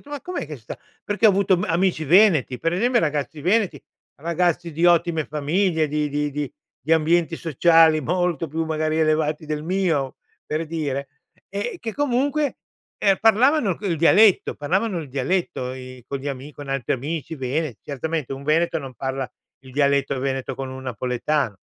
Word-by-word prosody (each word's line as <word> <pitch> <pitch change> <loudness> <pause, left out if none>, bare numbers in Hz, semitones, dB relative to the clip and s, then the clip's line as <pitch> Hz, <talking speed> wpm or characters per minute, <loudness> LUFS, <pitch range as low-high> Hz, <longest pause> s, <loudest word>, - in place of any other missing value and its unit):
"Ma 290 -2 -6
com’è 360 - -4
che 150 -1 -7
sta?" 115 -2 -9 0.3
Perché 205 +2 +2
ho - - +8
avuto 195 -1 +2
ma 180 - -2
amici 170 -1 +1
veneti, 165 -6 +4
pre 165 +7 0
esempio, 240 +5 +2
ragazzi 150 -4 -2
veneti, 185 -4 +1 0.4
ragazzi 170 0 0
di 165 +3 +2
ottime 170 -2 +3
famiglie, 160 +3 +1
di 150 0 -1
di 145 +1 -1
di 145 -2 -3 0.3
di 155 +6 -1
ambienti 165 +1 +2
sociali 165 0 +4
molto 175 +1 -1
più 160 +3 -2
magari 155 0 -1
elevati 155 0 +1
del 150 0 -3
mio, 165 -6 0 0.3
per 155 +2 -2
dire, 145 -4 -3 0.4
eh, 485 -6 -3
che 225 - -5
comunque, 285 +2 0 0.4
ehm, 195 -2 +2
parlavano 225 - +4
il 175 -5 -1
dialetto 200 +5 +5
parlavano 185 +7 -1
il 150 -5 -7
dialetto, 135 -1 -1
i 130 -1 -10
con 140 - -3
gli 135 - -8
ami 140 +1 -5
con 145 - -9
gli - - -12
altri 135 -3 0
amici 155 +5 -4
vene 135 -1 -2
certamente 150 0 -3
un 135 +1 -7
veneto 165 +2 +2
non 135 -4 -8
parla 130 +1 -3 0.3
il 130 -1 -14
dialetto 140 0 +2
veneto 135 -1 -2
con 135 +1 -5
un 130 0 -8
napoletano, 125 0 -1
155 Hz, 170 wpm, -23 LUFS, 140-180 Hz, 0.4 s, ho